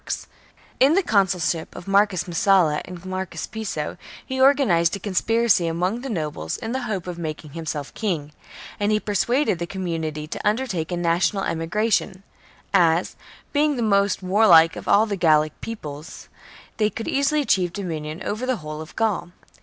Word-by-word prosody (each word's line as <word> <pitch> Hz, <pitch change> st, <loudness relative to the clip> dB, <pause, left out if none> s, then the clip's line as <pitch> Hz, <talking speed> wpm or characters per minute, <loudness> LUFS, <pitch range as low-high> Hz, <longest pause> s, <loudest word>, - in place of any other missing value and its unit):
^ -, -, -4 dB, 0.5 s
In 280 Hz, +5 st, +5 dB
the 390 Hz, -, +3 dB
consulship 185 Hz, -, 0 dB
of 180 Hz, -, -9 dB
Marcus 195 Hz, -2 st, +3 dB
Messala 175 Hz, -3 st, +2 dB
and 180 Hz, 0 st, -10 dB
Marcus 185 Hz, -3 st, -4 dB
Piso 200 Hz, -10 st, -4 dB, 0.3 s
he 260 Hz, 0 st, -2 dB
organized 235 Hz, -, +4 dB
a -, -, -6 dB
conspiracy 210 Hz, 0 st, +2 dB
among 180 Hz, +8 st, -1 dB
the 270 Hz, -, -5 dB
nobles 150 Hz, -, -3 dB
in 225 Hz, -, -5 dB
the 260 Hz, +2 st, -2 dB
hope 195 Hz, -5 st, -3 dB
of 175 Hz, -1 st, -6 dB
making 155 Hz, -2 st, -6 dB
himself 155 Hz, -2 st, -5 dB
king, 165 Hz, -9 st, -3 dB, 0.5 s
and 210 Hz, +1 st, +1 dB
persuaded 235 Hz, -, +1 dB
the 170 Hz, -, -3 dB
com 190 Hz, 0 st, -5 dB
munity 155 Hz, -3 st, -3 dB
to -, -, -4 dB
undertake 210 Hz, -7 st, -1 dB
a 175 Hz, -, -1 dB
national 175 Hz, +3 st, +1 dB
emigration, 190 Hz, +3 st, -1 dB, 0.5 s
as, 170 Hz, -2 st, +3 dB, 0.4 s
being 295 Hz, 0 st, +2 dB
the 240 Hz, -, -1 dB
most 200 Hz, -2 st, +2 dB
warlike 185 Hz, -4 st, +6 dB
of -, -, -8 dB
all 210 Hz, +2 st, +5 dB
the 210 Hz, -2 st, -2 dB
Gallic 155 Hz, -4 st, +2 dB
peoples, 155 Hz, -9 st, -8 dB, 0.5 s
they 215 Hz, -1 st, +2 dB
could 225 Hz, -, -6 dB
easily 280 Hz, +2 st, +1 dB
achieve 185 Hz, -10 st, +1 dB
dominion 165 Hz, -3 st, -5 dB
over 220 Hz, +7 st, -3 dB
the 255 Hz, -, +1 dB
whole 155 Hz, -5 st, -7 dB
of 160 Hz, -, -11 dB
Gaul. 220 Hz, -6 st, 0 dB
185 Hz, 165 wpm, -23 LUFS, 165-220 Hz, 0.5 s, warlike